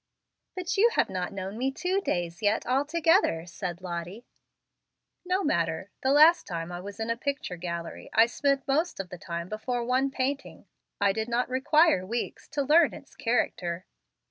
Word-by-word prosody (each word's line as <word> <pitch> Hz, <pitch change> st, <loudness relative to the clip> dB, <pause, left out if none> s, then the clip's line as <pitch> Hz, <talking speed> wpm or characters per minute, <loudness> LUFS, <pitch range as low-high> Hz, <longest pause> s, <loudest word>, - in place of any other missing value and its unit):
"But 370 Hz, +2 st, -2 dB
you 450 Hz, +4 st, +6 dB
have -, -, +2 dB
not 185 Hz, 0 st, -3 dB
known 195 Hz, +2 st, -5 dB
me 265 Hz, +2 st, +1 dB
two 365 Hz, +7 st, -1 dB
days 175 Hz, -, -2 dB
yet 210 Hz, +1 st, +1 dB
altogether," 290 Hz, -, +2 dB
said 175 Hz, 0 st, -6 dB
Lottie. 180 Hz, +5 st, -6 dB, 1.0 s
"No 365 Hz, +2 st, 0 dB
matter. 170 Hz, -, 0 dB
The 265 Hz, -, +2 dB
last 310 Hz, +4 st, +6 dB
time 170 Hz, -1 st, -4 dB
I 175 Hz, -, -5 dB
was 200 Hz, +3 st, -9 dB
in 225 Hz, +1 st, -1 dB
a -, -, 0 dB
picture 280 Hz, -5 st, -3 dB
gallery, 170 Hz, -1 st, -6 dB
I 225 Hz, +1 st, +6 dB
spent 275 Hz, +3 st, 0 dB
most 310 Hz, -, 0 dB
o -, -, -1 dB
the 180 Hz, -1 st, -10 dB
time 170 Hz, 0 st, -5 dB
before 235 Hz, +4 st, -3 dB
one 260 Hz, +3 st, +2 dB
painting. 270 Hz, +1 st, -3 dB, 0.3 s
I 200 Hz, -1 st, +3 dB
did 220 Hz, +2 st, -3 dB
not 240 Hz, +2 st, 0 dB
require 295 Hz, -, +3 dB
weeks 230 Hz, +6 st, -4 dB
to 290 Hz, -1 st, -1 dB
learn 310 Hz, +4 st, +4 dB
its 280 Hz, -, -14 dB
character." 185 Hz, -7 st, -1 dB
235 Hz, 170 wpm, -28 LUFS, 180-285 Hz, 1.0 s, you